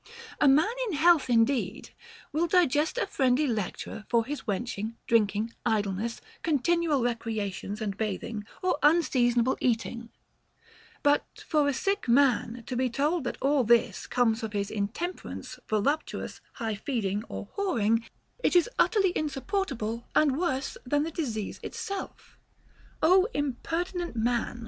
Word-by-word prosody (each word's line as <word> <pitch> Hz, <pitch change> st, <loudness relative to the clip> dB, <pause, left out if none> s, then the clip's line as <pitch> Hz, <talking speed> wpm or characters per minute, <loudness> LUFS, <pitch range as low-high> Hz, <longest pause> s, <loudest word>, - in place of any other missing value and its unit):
A 290 Hz, -, +5 dB
man 285 Hz, +4 st, +6 dB, 0.2 s
in 405 Hz, -, -3 dB
health 315 Hz, -2 st, +4 dB
indeed 230 Hz, -2 st, +1 dB, 0.4 s
will 325 Hz, +4 st, +1 dB
digest 325 Hz, -, +2 dB
a -, -, +1 dB
friendly 265 Hz, +2 st, +2 dB
lecture 220 Hz, -2 st, -3 dB
for 230 Hz, -2 st, +3 dB
his 290 Hz, +2 st, -6 dB
wenching, 220 Hz, +1 st, -3 dB
drinking, 220 Hz, 0 st, +2 dB
idleness, 215 Hz, 0 st, -1 dB, 0.2 s
continual 320 Hz, -2 st, +1 dB
recreations 220 Hz, -3 st, -3 dB
and 200 Hz, -2 st, -2 dB
bathing, 210 Hz, +1 st, -3 dB, 0.2 s
or 365 Hz, -5 st, +1 dB
unseasonable 260 Hz, -6 st, +3 dB
eating; 235 Hz, -1 st, -1 dB, 0.9 s
but 290 Hz, 0 st, +1 dB
for 300 Hz, -3 st, +3 dB
a -, -, +3 dB
sick 395 Hz, +1 st, -1 dB
man 245 Hz, -2 st, +3 dB
to 255 Hz, -, -4 dB
be 255 Hz, +1 st, +1 dB
told 290 Hz, +5 st, 0 dB
that -, -, -3 dB
all 275 Hz, -1 st, +3 dB
this 235 Hz, -2 st, +2 dB
comes 230 Hz, -2 st, +2 dB
of 220 Hz, -2 st, -4 dB
his 200 Hz, 0 st, -2 dB
intemperance, 220 Hz, -, -4 dB
voluptuous 245 Hz, +9 st, -1 dB
ness, -, -, -23 dB
high 225 Hz, -3 st, -3 dB
feeding, 210 Hz, -3 st, -2 dB
or 205 Hz, -, -6 dB
whoring, 230 Hz, -, +1 dB, 0.4 s
is 355 Hz, +3 st, +4 dB
utterly 390 Hz, -5 st, +3 dB
insupportable 270 Hz, -, -2 dB
and 290 Hz, -4 st, +4 dB
worse 275 Hz, -6 st, -1 dB
than 290 Hz, +3 st, +1 dB
the 325 Hz, -, -3 dB
disease 230 Hz, -, -3 dB
itself. 395 Hz, -1 st, -6 dB, 0.6 s
Ο 370 Hz, +4 st, +6 dB
impertinent 330 Hz, +5 st, -2 dB
man 235 Hz, +1 st, 0 dB
250 Hz, 135 wpm, -28 LUFS, 225-305 Hz, 0.9 s, man